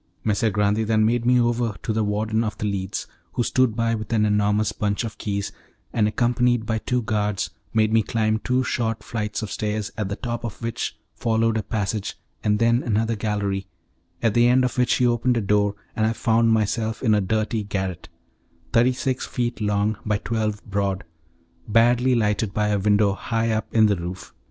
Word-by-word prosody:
Messer 110 Hz, +1 st, +1 dB
Grande 105 Hz, +2 st, +1 dB
then 110 Hz, -1 st, +3 dB
made 120 Hz, +1 st, +1 dB
me 125 Hz, 0 st, +5 dB
over 120 Hz, -2 st, +1 dB
to 110 Hz, -, -1 dB
the 110 Hz, 0 st, +1 dB
warden 110 Hz, +2 st, 0 dB
of 110 Hz, -1 st, -3 dB
The -, -, -3 dB
Leads, 95 Hz, -2 st, -2 dB, 0.3 s
who 120 Hz, -, 0 dB
stood 130 Hz, -2 st, +2 dB
by 115 Hz, 0 st, +1 dB
with 110 Hz, -1 st, -4 dB
an 110 Hz, -2 st, +3 dB
enormous 105 Hz, 0 st, +2 dB
bunch 105 Hz, +1 st, -1 dB
of 110 Hz, -2 st, -6 dB
keys, 100 Hz, -1 st, -2 dB, 0.4 s
and 105 Hz, -2 st, +3 dB
accompanied 120 Hz, +1 st, +1 dB
by 110 Hz, -1 st, -1 dB
two 125 Hz, +2 st, -1 dB
guards, 105 Hz, -2 st, -1 dB, 0.2 s
made 110 Hz, -1 st, +2 dB
me 115 Hz, -, +5 dB
climb 110 Hz, 0 st, 0 dB
two 125 Hz, +3 st, +1 dB
short 115 Hz, -3 st, -1 dB
flights 105 Hz, -1 st, -3 dB
of 110 Hz, -, -5 dB
stairs, 105 Hz, -1 st, -2 dB
at 105 Hz, -3 st, -1 dB
the 100 Hz, -, -2 dB
top 120 Hz, 0 st, -4 dB
of 115 Hz, -, -5 dB
which 115 Hz, -2 st, -3 dB, 0.2 s
followed 115 Hz, -1 st, +1 dB
a 110 Hz, -, +1 dB
passage 105 Hz, -1 st, -3 dB, 0.3 s
and 105 Hz, 0 st, +2 dB
then 115 Hz, +2 st, +3 dB
another 115 Hz, 0 st, 0 dB
gallery, 100 Hz, -2 st, -2 dB, 0.6 s
at 115 Hz, -3 st, +3 dB
the 120 Hz, +1 st, +5 dB
end 130 Hz, +1 st, +4 dB
of 125 Hz, -, -2 dB
which 125 Hz, 0 st, +3 dB
he 125 Hz, -, +2 dB
opened 120 Hz, +1 st, +2 dB
a -, -, +3 dB
door, 105 Hz, 0 st, +2 dB, 0.2 s
and 110 Hz, 0 st, +2 dB
I 110 Hz, -, +1 dB
found 115 Hz, 0 st, +2 dB
myself 110 Hz, +1 st, 0 dB
in 110 Hz, -4 st, +4 dB
a 105 Hz, -, +3 dB
dirty 110 Hz, +3 st, 0 dB
garret, 95 Hz, -4 st, -4 dB, 0.6 s
thirty 120 Hz, +2 st, +4 dB
six 130 Hz, 0 st, -2 dB
feet 120 Hz, -2 st, -2 dB
long 105 Hz, 0 st, +1 dB
by 105 Hz, -1 st, +1 dB
twelve 110 Hz, -1 st, -2 dB
broad, 100 Hz, -2 st, -1 dB, 0.6 s
badly 120 Hz, +3 st, +4 dB
lighted 105 Hz, -2 st, 0 dB
by 105 Hz, 0 st, +1 dB
a 105 Hz, -1 st, +1 dB
window 100 Hz, 0 st, +3 dB
high 115 Hz, +2 st, -1 dB
up 110 Hz, 0 st, -1 dB
in 110 Hz, -1 st, +5 dB
the 100 Hz, -2 st, +2 dB
roof. 90 Hz, +2 st, -7 dB
110 Hz, 195 wpm, -23 LUFS, 105-115 Hz, 0.6 s, me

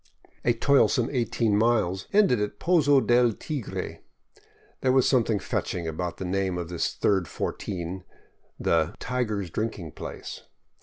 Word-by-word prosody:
A 120 Hz, -, +3 dB
toilsome 125 Hz, -1 st, +3 dB
eighteen 115 Hz, -4 st, +1 dB
miles 105 Hz, -4 st, +1 dB
ended 195 Hz, -, +4 dB
at 105 Hz, 0 st, -3 dB
Pozo 145 Hz, -4 st, +4 dB
del 120 Hz, -1 st, +4 dB
Tigre 140 Hz, 0 st, -5 dB, 0.4 s
— -, -, -33 dB
there 130 Hz, -, +3 dB
was 130 Hz, -1 st, +4 dB
some 130 Hz, -3 st, +4 dB
thing 110 Hz, -1 st, 0 dB
fetching 90 Hz, -3 st, -3 dB
about 85 Hz, +2 st, -3 dB
the 95 Hz, -, -5 dB
name 95 Hz, 0 st, -1 dB
of 85 Hz, -1 st, -4 dB
this 85 Hz, -1 st, -1 dB
third 95 Hz, -4 st, +1 dB
f -, -, -14 dB
ortin, 95 Hz, -1 st, -3 dB, 0.3 s
— -, -, -41 dB
the 85 Hz, +3 st, +1 dB
" -, -, -44 dB
Tiger's 110 Hz, -7 st, -2 dB
Drinking 105 Hz, -7 st, -3 dB
place." -, -, -8 dB
105 Hz, 160 wpm, -26 LUFS, 90-125 Hz, 0.4 s, ended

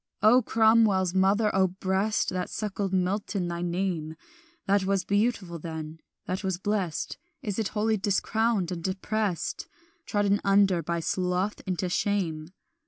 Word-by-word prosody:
"O 235 Hz, +4 st, +7 dB
Cromwell's 220 Hz, -5 st, +3 dB
mother, 200 Hz, +3 st, +3 dB
O 190 Hz, -1 st, +4 dB
breast 190 Hz, +3 st, 0 dB
That 180 Hz, -1 st, -3 dB
suckled 205 Hz, -2 st, -3 dB
Milton! 190 Hz, 0 st, -1 dB
thy 170 Hz, 0 st, -4 dB
name 175 Hz, -3 st, -2 dB, 0.5 s
That 200 Hz, 0 st, +2 dB
was 195 Hz, -1 st, 0 dB
beautiful 200 Hz, -5 st, 0 dB
then, 160 Hz, 0 st, -6 dB, 0.3 s
that 185 Hz, +3 st, -3 dB
was 190 Hz, -2 st, -1 dB
blest, 190 Hz, -4 st, -2 dB, 0.2 s
Is 205 Hz, -1 st, -2 dB
it 220 Hz, -, 0 dB
wholly 215 Hz, +1 st, 0 dB
discrowned 205 Hz, -1 st, +1 dB
and 170 Hz, -2 st, -5 dB
deprest, 195 Hz, -1 st, -2 dB, 0.4 s
Trodden 205 Hz, -1 st, +1 dB
under 195 Hz, -3 st, +4 dB
by 170 Hz, +1 st, -2 dB
sloth 180 Hz, +4 st, -1 dB
into 185 Hz, 0 st, -1 dB
shame? 175 Hz, -4 st, -1 dB
190 Hz, 135 wpm, -27 LUFS, 180-205 Hz, 0.5 s, O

